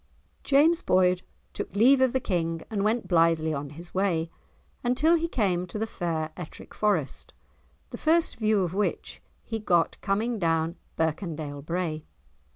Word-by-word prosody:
James 315 +5 +4
Boyd 185 - +3 0.3
took - - -5
leave 255 +6 +5
of 260 -2 +4
the 260 - +1
King 165 -7 -2
and 205 -2 -1
went 220 +3 0
blithely 165 -2 +3
on 140 -1 -4
his 170 +4 -11
way, 170 -4 0 0.5
until 255 +7 +3
he 335 0 +2
came 185 - 0
to 180 - -6
the 220 - -1
fair 165 -6 -3
Ettrick 175 -3 -10
Forest, 195 -10 -1 0.6
the - - -7
first 325 +1 +2
view 215 -3 +2
of 175 -1 -3
which 205 +1 -2 0.2
he 225 -1 -4
got 175 -5 +1
coming 220 +4 0
down 165 -1 +1 0.2
Birkendale 155 -3 -2
Brae. 165 -1 -2
185 Hz, 155 wpm, -27 LUFS, 165-225 Hz, 0.6 s, leave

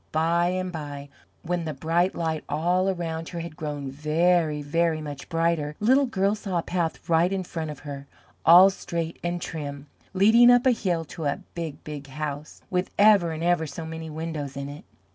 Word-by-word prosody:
By 165 +2 +2
and 185 0 -2
by, 145 -3 -7 0.3
when 175 0 -2
the 155 -2 -4
bright 170 +6 +1
light 160 -2 -2
all 180 +5 +1
around 165 -3 -3
her 170 - -5
had 165 -2 -8
grown 145 -3 -5
very, 155 +1 +1
very 165 +2 +1
much 145 -2 -7
brighter, 165 -3 0
Little 260 +6 +4
Girl 195 -3 +1
saw 200 -4 -3
a 170 - 0
path 175 -2 -2
right 170 +2 +3
in 195 -1 -1
front 165 -3 -5
of 150 -3 -8
her, 140 -1 -8 0.4
all 180 +4 +8
straight 170 -3 -4
and 175 0 -1
trim, 145 -4 -6 0.3
leading 225 +5 +6
up 245 +1 +5
a 260 - +6
hill 180 -8 -1
to 160 +1 -7
a 145 +7 -1
big, 165 -4 -6
big 145 -2 -7
house 150 +1 -6
with 180 0 0
ever 200 -5 +5
and 160 +1 -4
ever 175 -2 +2
so 160 +3 -7
many 160 0 -6
windows 155 -3 -5
in 140 0 -4
it. 145 +1 -10
165 Hz, 190 wpm, -25 LUFS, 150-180 Hz, 0.4 s, all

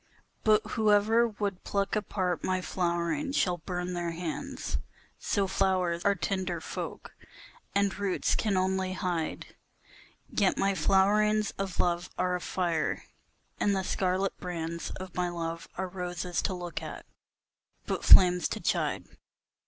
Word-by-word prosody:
But 215 0 +4
whosoever 220 +1 +3
would 205 -4 -3
pluck 200 0 -1
apart 185 -4 -1
my 185 0 +1
flowering 175 - -1
shall 180 -9 +2
burn 180 +1 -3
their 175 -1 -2
hands, 165 -1 -4 0.4
So 200 -2 +1
flowers 185 -3 +1
are 200 0 +3
tender 185 -1 -2
folk, - - -6 0.6
and 200 -1 +2
roots 200 -2 +1
can 205 -4 +1
only 185 0 0
hide, 175 -3 -3 0.7
Yet 200 -3 +1
my 195 0 +2
flowerings 205 +4 +3
of 195 -2 -3
love 175 0 +1
are 180 0 +1
a 180 - -3
fire, 170 -5 -1 0.6
and 200 -1 +2
the 190 - 0
scarlet 185 +1 0
brands 170 -2 -4
Of 185 -1 -7
my 180 -1 0
love 165 -1 -4
are 190 0 -1
roses 180 -1 -3
to 195 - 0
look 175 -1 -5
at, - - -7 0.8
but - - -2
flames 180 -1 +8
to - - -4
chide. - - 0
185 Hz, 135 wpm, -29 LUFS, 175-200 Hz, 0.8 s, flames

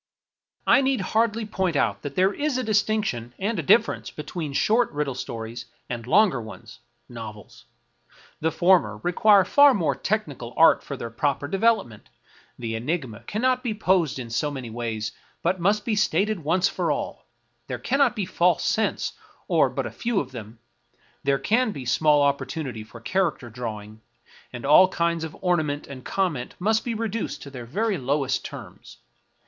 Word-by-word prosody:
I - - +5
need 270 -1 +1
hardly 225 0 0
point 190 -5 -1
out 105 -7 +1
that 140 -1 -6
there 190 +2 +3
is 290 -3 -1
a 255 - -1
distinction 205 - 0
and 210 +4 -1
a - - +1
difference 225 -1 +2
between 155 0 -6
short 225 - +2
riddle 145 -2 -2
stories 115 -1 -6 0.2
and 120 -1 -5
long 205 +7 +5
ones 110 - -11 0.2
— - - -45
novels. 115 +2 -11 0.7
The 160 +1 0
former 180 +2 +3
require 195 +2 +5
far 285 +4 +6
more 170 -5 +1
technical 145 - -3
art 165 - +6
for 140 - -6
their 115 -2 -6
proper 140 +3 -1
development; 195 - 0 0.5
the 115 -2 -4
enigma 125 -1 -3
cannot 255 +4 +1
be 230 -4 -2
posed 180 -9 +1
in 120 -3 -7
so 135 +6 0
many 130 -5 -6
ways, 110 -2 -3 0.3
but 180 +2 +1
must 205 +4 +1
be 225 - 0
stated 205 -1 +1
once 180 +5 +2
for 175 -5 -1
all; 145 - -4 0.4
there 125 - -3
cannot 260 - +2
be 205 - -1
false 175 -1 +2
scents, 220 - 0 0.3
or - - +3
but - - -3
a - - -5
few 235 -4 -1
of 130 - -5
them; 115 -2 -9 0.7
there 140 0 +2
can 225 - +1
be 135 -9 -7
small 145 +5 +3
oppor 140 0 +1
tunity 130 -9 -5
for 110 +2 -13
character 160 -5 -1
drawing, 110 -2 -7 0.5
and 125 0 -7
all 155 +6 +7
kinds 170 -2 -1
of 160 -1 -7
ornament 155 -5 0
and 130 -2 -10
comment 180 -10 -2
must 220 +4 +1
be 235 -2 -3
reduced 220 -8 -3
to 140 - -10
their 125 -3 -8
very 205 - -1
lowest 135 +1 0
terms. - - -10
160 Hz, 170 wpm, -25 LUFS, -, 0.7 s, all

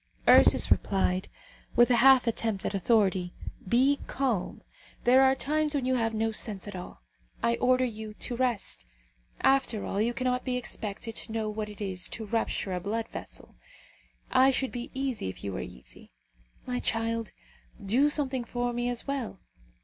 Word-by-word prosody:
Ursus - - +7
replied, 190 -1 +1 0.5
with 240 +1 +5
a 240 - +5
half 265 +1 +6
attempt 225 -3 -1
at - - -2
authority, 190 -3 +1 0.3
"Be 270 +5 +3
calm. 250 -9 -2 0.4
There 255 +2 +6
are 265 0 +5
times 300 +2 0
when 270 -3 0
you 260 - +1
have 225 -3 0
no 225 +1 0
sense 210 -3 -4
at 205 - -7
all. 180 - -9 0.4
I 235 - +3
order 255 0 +3
you 220 -2 -6
to 240 - -4
rest. 235 - -1 0.5
After 265 -6 +2
all, 200 - -1
you 235 +2 0
cannot 250 -1 -1
be 250 -1 -1
expected 225 -2 -5
to - - -3
know 220 -1 -2
what 210 0 -4
it 210 0 -11
is 190 -3 -1
to 220 - -5
rupture 210 -3 -2
a 180 - -1
blood 220 +5 -3
vessel. - - -9 0.7
I 260 +1 +6
should 265 0 0
be 245 -1 -6
easy 265 - -2
if 95 - -9
you 100 - -4
were 95 - -4
easy. 60 0 -11 0.5
My 250 -1 -2
child, 230 -1 -1 0.5
do 255 +9 +3
something 270 -4 0
for 245 +1 -2
me 240 +1 -1
as 245 -1 -3
well. 270 -8 -4
235 Hz, 170 wpm, -28 LUFS, 210-255 Hz, 0.7 s, Ursus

